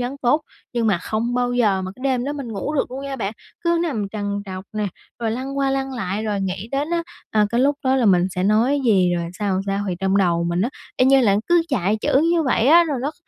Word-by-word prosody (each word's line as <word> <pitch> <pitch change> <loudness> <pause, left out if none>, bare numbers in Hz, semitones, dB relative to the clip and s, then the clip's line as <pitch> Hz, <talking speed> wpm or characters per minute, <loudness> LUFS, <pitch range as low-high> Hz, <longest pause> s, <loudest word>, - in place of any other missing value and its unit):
vấn 250 +3 -3
tốt, 260 +5 +3 0.3
nhưng 235 -2 0
mà 195 -5 +2
không 225 +6 -2
bao 245 0 0
giờ 210 -6 +2
mà 185 - -4
cái 255 - -13
đêm 255 -2 +1
đó 285 - -2
mình 275 -5 -6
ngủ 220 +9 -3
được 275 - 0
luôn 260 +2 -5
nha 275 -1 -4
bạn, 210 -4 -3 0.3
cứ 340 0 +2
nằm 225 - -2
trằn 205 -1 -3
trọc 185 0 -7
nè, 215 -1 -1 0.3
rồi 225 -2 -1
lăn 265 +4 -4
qua 275 -1 +1
lăn 270 0 -2
lại, 205 -3 -3
rồi 205 -2 -1
nghĩ 190 +3 -3
đến 290 +4 -1
á, 340 0 0 0.3
à, 210 -1 +3
cái 235 - +1
lúc 280 +3 +3
đó 260 0 +3
là 250 -4 +2
mình 180 -3 +5
sẽ 180 0 -3
nói 225 +8 +3
gì 185 -6 +3
rồi 170 -1 -3
sao, 195 -3 0
sao. 195 - 0 0.2
Thì 180 - -1
trong 190 0 +1
đầu 170 -3 +2
mình 170 +1 0
á, 225 - +1 0.3
y 255 - +4
như 270 0 +6
là 200 -5 +3
cứ 345 -1 +4
chạy 210 -6 +1
chữ 270 - +3
như 335 -1 +2
vậy 255 -4 +1
á, 340 +2 +7
rồi 295 -5 -2
nó 285 - -1
kh - - -22
235 Hz, 270 wpm, -21 LUFS, 195-270 Hz, 0.3 s, á